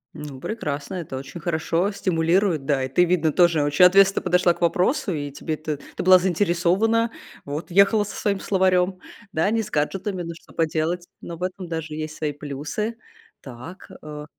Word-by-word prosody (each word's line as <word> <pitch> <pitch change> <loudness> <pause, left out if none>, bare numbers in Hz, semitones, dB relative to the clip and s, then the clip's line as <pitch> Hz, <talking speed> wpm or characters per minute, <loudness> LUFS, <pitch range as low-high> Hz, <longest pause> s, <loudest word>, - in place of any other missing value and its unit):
Ну 145 -3 -8
прекрасно. 150 -4 -4
Это 155 -7 -5
очень 135 +6 -8
хорошо 170 +4 0
стимулирует. 170 -3 +1
Да 140 -3 +1
и - - -1
ты, 175 +7 +3
видно, 170 -3 +2
тоже 170 -4 +4
очень 145 +5 +5
ответственно 195 +1 +5
подошла 180 0 +3
к - - -18
вопросу, 180 - +1
и 145 -3 -3
тебе 155 +2 -4
это, 155 -2 -5 0.2
ты - - -3
была 185 0 +7
заинтересована, 190 +5 +1 0.3
вот 150 +5 -5
ехала 200 +3 +5
со 205 - -8
своим 200 -2 -1
словарем, 185 -1 +1 0.3
да, 165 +4 +1
не 225 0 +1
с 210 - -9
гаджетами, 185 +5 -1
но 170 0 -5
что - - -18
поделать? 165 +2 -1
Но 170 -1 -7
в 180 - -6
этом 185 -1 -4
даже 160 -2 -5
есть 155 0 -5
свои 150 -2 -1
плюсы. 150 +10 -5 0.4
Так, 130 +8 -11
э 150 -1 -7
170 Hz, 180 wpm, -23 LUFS, 150-190 Hz, 0.4 s, была